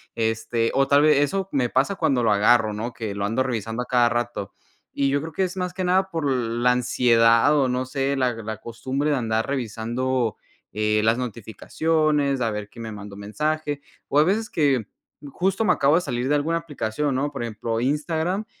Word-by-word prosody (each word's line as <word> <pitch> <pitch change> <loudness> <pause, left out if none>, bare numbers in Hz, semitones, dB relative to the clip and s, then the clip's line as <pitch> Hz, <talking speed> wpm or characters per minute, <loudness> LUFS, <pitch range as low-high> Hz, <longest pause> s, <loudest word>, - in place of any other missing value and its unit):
este, 115 +1 0
o 135 0 +2
tal 145 +1 +5
vez 150 -2 +5
eso 190 +7 0
me 125 -3 +1
pasa 135 +12 +1
cuando 130 -7 +1
lo 110 - +3
agarro, 110 +1 +3
¿no? 115 +4 -4
Que 110 -3 -5
lo 100 - -3
ando 115 +5 0
revisando 115 -1 -3
a - - -10
cada 120 -2 +3
rato. 120 -4 -3 0.4
Y 140 -1 +1
yo 140 +1 +1
creo 160 +2 -6
que 190 - 0
es 185 +1 -3
más 180 -1 -2
que 185 - -2
nada 190 +1 +2
por 165 -4 -2
la 120 0 +1
ansiedad 120 +1 +4
o 135 -3 +2
no 125 +1 -1
sé, 135 +1 -1
la 125 -2 +1
la 110 -1 -6
costumbre 130 +6 -3
de 145 - +2
andar 110 -2 0
revisando, 120 -2 -2 0.4
eh, 105 0 +1
las 115 +2 +3
notificaciones, 140 +5 -1
a 115 -2 +1
ver 105 -1 -5
quién 115 - -10
me 110 - -6
mandó 105 -1 -9
mensaje. 145 +8 -2 0.3
O 145 - +3
a 150 - +7
veces 215 +5 0
que 135 -8 +1 0.4
justo 190 +4 0
me 180 - +4
acabo 140 +3 +3
de 180 - +3
salir 125 -5 -2
de 150 - +3
alguna 160 +3 0
aplicación, 145 -4 -2
¿no? 145 +2 -1
Por 135 -4 -5
ejemplo, 115 0 -3
Instagram, 160 - -1
130 Hz, 205 wpm, -23 LUFS, 115-150 Hz, 0.4 s, a